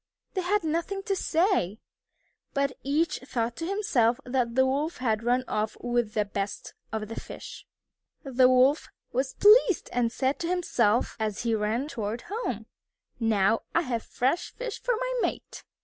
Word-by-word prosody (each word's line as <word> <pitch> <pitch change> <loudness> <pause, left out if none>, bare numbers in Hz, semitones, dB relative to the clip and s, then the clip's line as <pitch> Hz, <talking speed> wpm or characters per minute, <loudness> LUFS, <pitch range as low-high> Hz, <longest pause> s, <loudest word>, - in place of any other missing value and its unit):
They 375 - 0
had 390 +2 +1
nothing 335 +5 -2
to 390 0 0
say, 330 - +1 0.8
but 280 -1 +1
each 305 +4 0
thought 235 -3 -2
to 330 - -3
himself 255 - +2
that 245 -2 0
the 260 0 +5
Wolf 285 +5 -1
had 225 -4 0
run 245 +2 +2
off 215 0 -2
with 240 -3 -1
the 210 -1 +2
best 200 0 -4 0.2
of 220 -1 -3
the 225 - -5
fish. - - -10 0.6
The 260 -2 +4
Wolf 255 +4 +4 0.2
was 260 +2 -1
pleased 420 -3 +5
and 235 -1 +1
said 265 +3 0
to 335 - -2
himself, 245 - +1
as 215 -1 -2
he 230 -1 +1
ran 220 +5 0
toward 225 -4 -4
home, 465 +3 -3 0.5
"Now 225 -1 +2
I 335 - +5
have 240 -5 -2
fresh 265 +10 -1
fish 485 -4 -5
for - - +1
my - - -1
mate." - - -3
255 Hz, 165 wpm, -27 LUFS, 230-335 Hz, 0.8 s, the